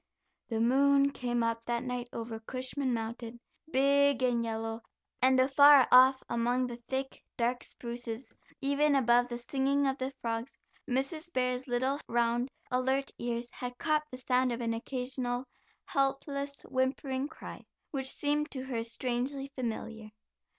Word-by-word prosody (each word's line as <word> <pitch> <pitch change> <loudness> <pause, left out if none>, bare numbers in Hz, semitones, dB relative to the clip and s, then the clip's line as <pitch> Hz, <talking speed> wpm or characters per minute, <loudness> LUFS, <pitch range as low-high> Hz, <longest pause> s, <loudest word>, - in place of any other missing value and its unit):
The 225 -2 -1
moon 275 +4 +4
came 240 -3 -1
up 230 0 -1
that 235 0 -1
night 250 -1 -3
over 225 -1 -5
Cushman 255 +3 -3
Mountain, 230 +1 -4 0.3
big 280 -1 +3
and 240 -2 +2
yellow, 225 0 -3 0.4
and 260 0 +5
afar 280 +1 +7
off 260 +1 +7
among 240 +2 +1
the 240 -1 -5
thick, 265 +3 -5
dark 245 +1 0
spruces, 235 0 -7 0.3
even 285 +1 +3
above 245 -2 +4
the 240 -1 -4
singing 275 +3 0
of 270 0 0
the 260 0 -1
frogs, 230 +2 -3 0.3
Mrs. 290 +7 -2
Bear's 250 0 0
little 260 +3 0
round, 235 +2 +1 0.2
alert 265 +2 +1
ears 240 0 -3
had 245 0 -6
caught 305 -1 +2
the 255 - -8
sound 255 0 +1
of 235 - -3
an 230 -1 -1
occasional, 250 +1 -3 0.4
helpless 280 +1 -1
whimpering 260 +1 -1
cry, - - -10 0.3
which 265 -2 -1
seemed 295 +2 0
to 260 -2 -5
her 250 -3 -2
strangely 255 +4 -2
familiar. 225 -3 -4
255 Hz, 145 wpm, -31 LUFS, 240-275 Hz, 0.4 s, afar